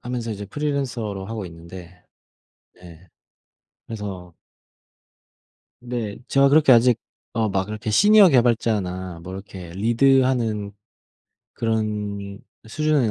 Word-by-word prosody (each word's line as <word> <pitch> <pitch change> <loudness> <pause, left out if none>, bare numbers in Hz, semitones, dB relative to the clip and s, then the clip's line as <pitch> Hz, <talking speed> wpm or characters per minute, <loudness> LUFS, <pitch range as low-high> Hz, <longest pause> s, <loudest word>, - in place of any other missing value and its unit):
하면서 120 -2 -4
이제 105 -1 -5
프리랜서로 120 -7 -3
하고 110 -2 -5
있는데, 85 +1 -12 0.7
네 90 0 -15 0.8
그래서 95 -6 -7 1.6
네. 115 -4 -3
제가 135 0 +4
그렇게 150 -1 +5
아직 120 -1 +5 0.3
어 110 -2 0
막 95 0 -1
이렇게 110 0 -5
시니어 205 - +6
개발자나 105 - 0
뭐 95 +1 -8
이렇게 95 -2 -9
리드하는 115 0 +2 0.8
그런 105 -3 -3 0.3
수준은 150 -3 +1
110 Hz, 240 characters per minute, -22 LUFS, 95-125 Hz, 1.6 s, 시니어